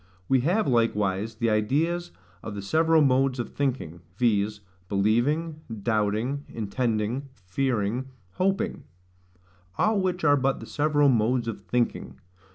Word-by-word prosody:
We 135 - +4
have 175 - +1
likewise 110 -3 +1
the 115 0 0
ideas 155 +12 0 0.3
of 105 - -6
the 100 - -5
several 160 +7 +3
modes 135 -1 +2
of 120 - -3
thinking 125 - -3 0.2
viz. 105 -3 +1 0.3
believing, 135 +11 +1 0.2
doubting, 110 +6 0
intending, 115 +4 -2
fearing, 120 +4 -1 0.2
hoping; 190 - -1 0.9
all 215 -2 +2
which 180 -2 -1
are 145 -2 +5
but 135 0 0
the - - -8
several 145 -1 +2
modes 120 0 +2
of 110 -3 -4
thinking. 120 +5 -2
125 Hz, 125 wpm, -26 LUFS, 105-145 Hz, 0.9 s, are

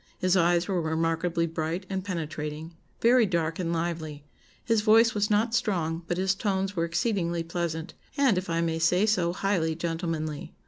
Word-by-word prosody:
His 185 0 +2
eyes 175 -1 +3
were 185 -3 0
remarkably 165 +1 0
bright 165 +3 -3
and 190 -1 -3
penetrating, 155 -3 -5 0.3
very 235 -1 +5
dark 165 -2 -1
and 170 -2 -1
lively: 165 -3 -3 0.4
his 225 -2 +2
voice 225 +1 +5
was 205 0 0
not 220 +2 +2
strong, 170 -8 0
but 175 - -1
his 190 +1 +2
tones 195 -1 -1
were 165 -1 +1
exceedingly 170 -2 -1
pleasant, 165 0 -4 0.2
and 270 -7 +4
if 185 0 -3
I 165 0 0
may 165 -1 -1
say 180 +5 +3
so, 180 -6 +1
highly 180 -4 0
gentlemanly. 165 -2 -4
170 Hz, 170 wpm, -27 LUFS, 165-195 Hz, 0.4 s, very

